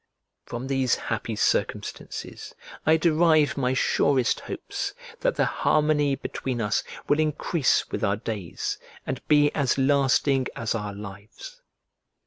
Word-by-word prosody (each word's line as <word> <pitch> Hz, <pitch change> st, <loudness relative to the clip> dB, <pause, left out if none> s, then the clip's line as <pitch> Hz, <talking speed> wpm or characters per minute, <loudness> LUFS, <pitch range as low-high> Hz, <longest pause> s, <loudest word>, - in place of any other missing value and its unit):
From 120 Hz, +2 st, -5 dB
these 135 Hz, -2 st, +1 dB
happy -, -, -3 dB
circumstances -, -, -2 dB, 0.3 s
I 160 Hz, +1 st, +6 dB
derive 160 Hz, -2 st, +3 dB
my 130 Hz, -2 st, 0 dB
surest 130 Hz, -2 st, +2 dB
hopes, -, -, -5 dB, 0.2 s
that -, -, +1 dB
the -, -, +2 dB
harmony 150 Hz, -2 st, +2 dB
between 130 Hz, -2 st, -4 dB
us 105 Hz, -2 st, 0 dB, 0.2 s
will 145 Hz, -, +3 dB
increase 155 Hz, -1 st, +1 dB
with -, -, -3 dB
our 100 Hz, -1 st, +2 dB
days, 105 Hz, -6 st, -4 dB, 0.3 s
and 130 Hz, -1 st, -3 dB
be 145 Hz, -1 st, +4 dB
as 140 Hz, -4 st, +1 dB
lasting 135 Hz, -1 st, +3 dB
as 115 Hz, -, -2 dB
our 105 Hz, -3 st, -4 dB
lives. 105 Hz, -, -10 dB
135 Hz, 125 wpm, -25 LUFS, 115-150 Hz, 0.3 s, I